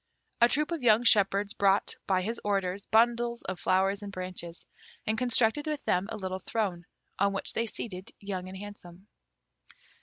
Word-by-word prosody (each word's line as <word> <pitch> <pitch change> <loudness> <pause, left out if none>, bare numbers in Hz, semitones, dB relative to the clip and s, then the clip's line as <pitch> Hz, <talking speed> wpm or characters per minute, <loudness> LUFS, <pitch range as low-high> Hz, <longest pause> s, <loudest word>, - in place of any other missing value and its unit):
A 235 - +7
troop 300 +5 0
of 335 -4 -2
young 230 -1 +5
shepherds 200 -2 +4
brought, 200 0 +2
by 185 -2 +2
his 225 +4 -3
orders, 195 -1 -1
bundles 235 +1 +2
of 185 -1 -5
flowers 195 +2 +1
and 205 -1 -7
branches, 180 -3 -5 0.4
and 220 - 0
constructed 245 +4 +2
with 300 -1 -3
them 180 +2 +1
a 220 - -4
little 190 -2 -4
throne, 185 -4 -3 0.3
on 200 0 +3
which 195 - -3
they 230 - -1
seated 190 -4 -6
Young 190 -2 -5
and 190 +1 -8
Handsome. 190 -2 -10
200 Hz, 170 wpm, -29 LUFS, 185-230 Hz, 0.4 s, A